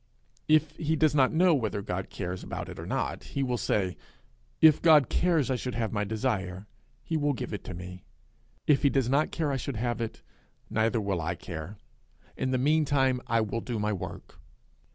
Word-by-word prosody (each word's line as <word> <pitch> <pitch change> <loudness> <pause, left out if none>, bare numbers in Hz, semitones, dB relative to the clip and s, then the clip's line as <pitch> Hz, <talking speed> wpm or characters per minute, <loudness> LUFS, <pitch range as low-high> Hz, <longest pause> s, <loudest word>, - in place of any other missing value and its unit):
'If 155 -1 +4
he 160 0 0
does 155 -1 +3
not 135 -3 +4
know 175 +2 +4
whether 110 -7 -1
God 95 -2 -4
cares 90 -1 -5
about - - -5
it - - -8
or - - -7
not, - - -2
he 140 - -3
will 125 -2 0
say, 95 -3 0 0.6
'If 155 -2 +7
God 155 -6 +6
cares 165 -7 +2
I - - +2
should 125 0 -4
have 110 -2 -1
my 105 -1 0
desire, 100 -4 -2 0.4
he 165 - -3
will 145 -1 +1
give 125 -3 -5
it 95 -3 -6
me; 90 0 -9 0.6
if 145 -2 +4
he 140 - +4
does 135 -3 +1
not 145 +3 +2
care 155 -3 -1
I 135 - 0
should 135 0 -4
have 120 +1 -2
it, 115 - -5 0.5
neither 115 +1 +2
will 100 -5 -1
I 85 +3 -2
care. 85 +3 -7 0.6
In 130 - -1
the 130 - +1
meantime 140 -2 +2
I 115 -1 +2
will 110 +2 -2
do 120 -1 -4
my 105 0 0
work.' 95 - -7
125 Hz, 195 wpm, -28 LUFS, 105-145 Hz, 0.6 s, If